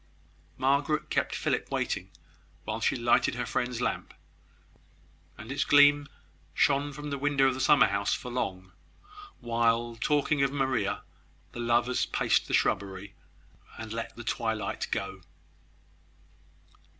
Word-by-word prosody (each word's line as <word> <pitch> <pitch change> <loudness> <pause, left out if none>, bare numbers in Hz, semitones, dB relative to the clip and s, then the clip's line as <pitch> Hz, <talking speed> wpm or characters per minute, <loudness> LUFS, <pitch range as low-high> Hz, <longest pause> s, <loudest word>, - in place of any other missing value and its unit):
Margaret 140 +3 +1
kept - - 0
Philip - - -1
waiting 95 - -2 0.5
while 110 +1 -4
she - - +2
lighted 120 0 +2
her 125 0 -2
friend's 125 0 -2
lamp; - - -3 1.2
and 110 +3 -9
its 140 - 0
gleam 145 0 +5 0.5
shone 140 +1 +2
from 145 +1 -7
the 140 - -3
window 140 -1 +2
of 135 - +2
the 130 - -6
summer 145 +2 +5
house 100 0 -1
for 125 - -7
long, 95 -6 -3 0.7
while, 115 0 +1
talking 145 +4 +1
of 135 -1 +2
Maria, 130 -8 -1 0.5
the - - -9
lovers 120 +1 +1
paced - - +1
the - - -5
shrubbery, 100 0 -1 0.6
and 110 0 -7
let 115 0 -5
the 120 - -8
twilight 110 -3 -2
go. - - -4
120 Hz, 130 wpm, -28 LUFS, 110-140 Hz, 1.2 s, gleam